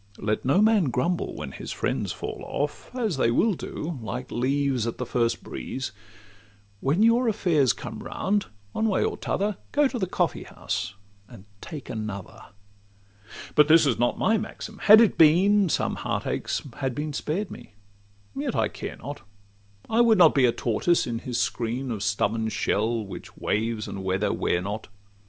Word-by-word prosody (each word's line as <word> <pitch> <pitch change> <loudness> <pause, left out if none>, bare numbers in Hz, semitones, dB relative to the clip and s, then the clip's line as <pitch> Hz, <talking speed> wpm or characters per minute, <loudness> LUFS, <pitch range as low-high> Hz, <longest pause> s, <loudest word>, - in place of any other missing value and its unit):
Let 105 0 -1
no 180 +11 +4
man 215 -5 +4
grumble 170 +7 -1
when - - -6
his - - -7
friends - - -2
fall - - -6
off, - - -3
As 220 - -1
they 115 - +3
will 210 - +3
do 160 -3 -5
like 120 +4 -5
leaves 130 -1 0
at 115 - -4
the 125 - -3
first 120 -1 0
breeze: 130 -5 -5 0.9
When 150 - +2
your 235 +2 +4
affairs 170 - +3
come - - -7
round, 205 +1 -1 0.2
one 220 - 0
way 195 - +2
or - - -1
t' - - -8
other, 200 0 0
Go 290 0 +4
to 255 -2 -4
the 190 - 0
coffee - - 0
house, 100 - -4 0.3
and 110 -5 -13 0.2
take 150 -4 -8
another. 110 -5 -6 1.1
But 150 0 +6
this 160 0 +6
is 130 -5 +1
not 120 0 +1
my 225 -1 +2
maxim: 215 0 -7
had 215 +2 +8
it 225 - +3
been, 185 +5 +5
Some - - 0
heart - - -2
aches - - -2
had 135 -3 -2
been 150 +1 -3
spared 180 +8 -2
me: 120 -4 -11 0.6
yet - - -2
I - - +1
care - - -7
not— - - -7 0.7
I 225 +2 +3
would 230 -2 +5
not 170 -4 +7
be 135 -3 +4
a 120 - +4
tortoise 120 +10 +1
in 115 -2 -3
his 120 0 -3
screen 120 +3 -2
Of 110 -3 -4
stubborn 110 +1 0
shell, 110 +1 0
which 100 - -10
waves 110 0 -1
and 95 - -6
weather 95 +2 0
wear 85 - 0
not. 105 +3 -4
135 Hz, 180 wpm, -26 LUFS, -, 1.1 s, had